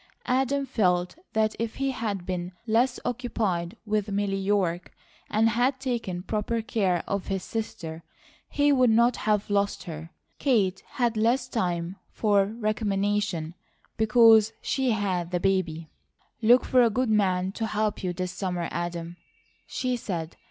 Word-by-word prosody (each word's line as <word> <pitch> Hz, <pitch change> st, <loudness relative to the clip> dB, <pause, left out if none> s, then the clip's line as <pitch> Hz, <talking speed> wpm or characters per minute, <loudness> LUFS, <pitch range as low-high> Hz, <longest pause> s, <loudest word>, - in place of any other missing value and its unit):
Adam 270 Hz, +2 st, +1 dB
felt 180 Hz, -8 st, +1 dB, 0.2 s
that 220 Hz, 0 st, +1 dB
if 230 Hz, -1 st, -2 dB
he 275 Hz, 0 st, 0 dB
had 210 Hz, -7 st, -3 dB
been 180 Hz, -1 st, -4 dB
less 240 Hz, +3 st, +2 dB
occupied 215 Hz, -6 st, -2 dB
with 210 Hz, -1 st, 0 dB
Milly 200 Hz, 0 st, 0 dB
York 190 Hz, -3 st, 0 dB, 0.4 s
and 220 Hz, +2 st, +3 dB
had 250 Hz, +4 st, +1 dB
taken 230 Hz, -9 st, -3 dB
proper 220 Hz, +2 st, -2 dB
care 200 Hz, -8 st, 0 dB
of 200 Hz, -1 st, -2 dB
his 190 Hz, -2 st, -2 dB
sister, 165 Hz, -8 st, -5 dB, 0.5 s
he 290 Hz, 0 st, +3 dB
would 255 Hz, -3 st, +4 dB
not 235 Hz, +2 st, +4 dB
have 210 Hz, -1 st, 0 dB
lost 200 Hz, 0 st, 0 dB
her. 160 Hz, -1 st, -7 dB, 0.3 s
Kate 200 Hz, -9 st, +2 dB
had 240 Hz, -3 st, +1 dB
less 240 Hz, +4 st, +2 dB
time 180 Hz, -5 st, -2 dB
for 205 Hz, -3 st, +2 dB
recrimination, 205 Hz, -5 st, -1 dB, 0.4 s
because 220 Hz, 0 st, +5 dB
she 265 Hz, -2 st, 0 dB
had 190 Hz, -6 st, 0 dB
the 180 Hz, 0 st, -1 dB
baby. 175 Hz, -4 st, 0 dB, 0.5 s
"Look 240 Hz, +3 st, +5 dB
for 255 Hz, -, +4 dB
a 235 Hz, -, +5 dB
good 245 Hz, +1 st, 0 dB
man 190 Hz, -3 st, +2 dB
to 225 Hz, +2 st, -3 dB
help 215 Hz, -1 st, -1 dB
you 180 Hz, -, 0 dB
this 180 Hz, +1 st, -3 dB
summer, 180 Hz, -4 st, -3 dB
Adam," 170 Hz, 0 st, -4 dB, 0.5 s
she 255 Hz, -1 st, -1 dB
said. 170 Hz, -7 st, -4 dB
210 Hz, 145 wpm, -26 LUFS, 180-230 Hz, 0.5 s, because